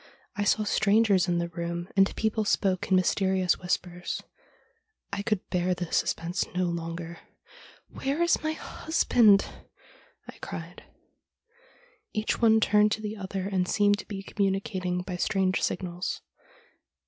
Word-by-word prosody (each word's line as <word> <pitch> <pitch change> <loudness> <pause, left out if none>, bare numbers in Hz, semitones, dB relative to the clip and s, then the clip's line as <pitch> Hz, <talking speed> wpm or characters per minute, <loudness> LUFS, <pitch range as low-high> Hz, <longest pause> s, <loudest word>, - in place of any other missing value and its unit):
I 205 - -1
saw 215 +1 +3
strangers 205 -2 +3
in 175 -1 +1
the 170 0 -1
room, 170 0 -4
and 195 0 +3
people 220 0 0
spoke 190 -3 0
in 190 - +4
mysterious 185 0 +2
whispers. 180 0 -3 0.9
I 200 - -1
could 210 -2 -2
bear 180 0 +1
the 175 -2 -5
suspense 170 +3 0
no 185 - +1
longer. 170 0 -4 0.4
" - - -21
Where 275 +3 -2
is 340 - +2
my 315 0 -1
husband? 235 -11 +3 0.4
" - - -29
I - - -11
cried. - - -8 1.3
Each 215 +1 -1
one 220 -1 +6
turned 210 0 +4
to 215 - -4
the 210 0 -4
other 195 -1 -4
and 185 -2 0
seemed 205 0 +3
to - - -9
be 195 -2 -6
communicating 190 -2 -1
by 180 -1 -5
strange 190 +1 +1
signals. 180 -1 -3
190 Hz, 145 wpm, -27 LUFS, 180-210 Hz, 1.3 s, one